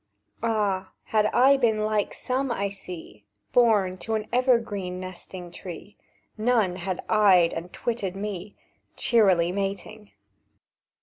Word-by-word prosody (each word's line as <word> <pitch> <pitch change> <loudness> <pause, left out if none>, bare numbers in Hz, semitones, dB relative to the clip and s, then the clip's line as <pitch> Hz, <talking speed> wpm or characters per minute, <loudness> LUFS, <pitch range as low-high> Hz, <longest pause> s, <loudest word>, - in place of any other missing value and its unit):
"Ah, 205 -4 0
had 215 -1 +2
I 270 +5 +5
been 220 -4 +1
like 215 -1 0
some 260 +1 -1
I 200 -3 -1
see, 180 - -9 0.3
Born 205 -6 +3
to 225 - -2
an 215 -1 -2
evergreen 225 -8 +1
nesting 185 -1 -8
tree, 180 +4 -9 0.4
None 215 -6 +2
had 185 0 -4
eyed 190 -6 +5
and 170 +2 -6
twitted 205 -6 -3
me, 200 -1 -5 0.4
Cheerily 190 -7 +3
mating!" 200 +2 -4
200 Hz, 120 wpm, -26 LUFS, 185-225 Hz, 0.4 s, I